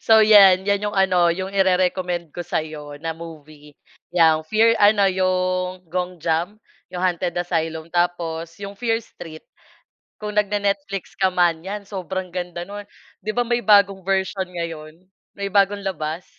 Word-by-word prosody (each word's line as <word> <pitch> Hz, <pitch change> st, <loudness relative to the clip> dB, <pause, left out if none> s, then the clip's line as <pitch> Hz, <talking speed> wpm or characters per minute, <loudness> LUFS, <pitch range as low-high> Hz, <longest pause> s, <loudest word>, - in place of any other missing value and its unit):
So, 220 Hz, 0 st, +7 dB
yan. 195 Hz, -3 st, +7 dB
Yan 200 Hz, 0 st, +1 dB
yung 205 Hz, -, -8 dB
ano, 185 Hz, -3 st, +3 dB
yung 185 Hz, +3 st, -3 dB
ire-recommend 180 Hz, -3 st, +1 dB
ko 175 Hz, -, -4 dB
sa'yo 155 Hz, -3 st, -5 dB
na 165 Hz, +1 st, -4 dB
movie, 155 Hz, -3 st, -12 dB, 0.4 s
yang 160 Hz, -2 st, +4 dB
Fear, 225 Hz, +4 st, +4 dB
ano, 205 Hz, -1 st, +5 dB
yung 185 Hz, -1 st, -1 dB
Gonjiam, 180 Hz, +2 st, -2 dB, 0.3 s
yung 180 Hz, 0 st, -5 dB
Haunted 180 Hz, -1 st, 0 dB
Asylum. 165 Hz, -2 st, -2 dB
Tapos 170 Hz, -2 st, -1 dB
yung 200 Hz, 0 st, -7 dB
Fear 225 Hz, -2 st, 0 dB
Street. 160 Hz, -6 st, -12 dB, 0.7 s
Kung 210 Hz, -1 st, -6 dB
nagne-Netflix 200 Hz, -2 st, -1 dB
ka 190 Hz, -, +4 dB
man, 175 Hz, -3 st, +2 dB
yan, 200 Hz, +3 st, -6 dB
sobrang 190 Hz, -2 st, -5 dB
ganda 175 Hz, -1 st, -5 dB
no'n. 205 Hz, +1 st, -9 dB, 0.3 s
Di 215 Hz, +2 st, -5 dB
ba 245 Hz, -, +2 dB
may 240 Hz, 0 st, 0 dB
bagong 200 Hz, -2 st, +4 dB
version 190 Hz, 0 st, -1 dB
ngayon, 165 Hz, -3 st, -6 dB, 0.4 s
may 200 Hz, -1 st, -4 dB
bagong 200 Hz, 0 st, +2 dB
labas? 165 Hz, -3 st, -4 dB
185 Hz, 145 wpm, -22 LUFS, 170-200 Hz, 0.7 s, So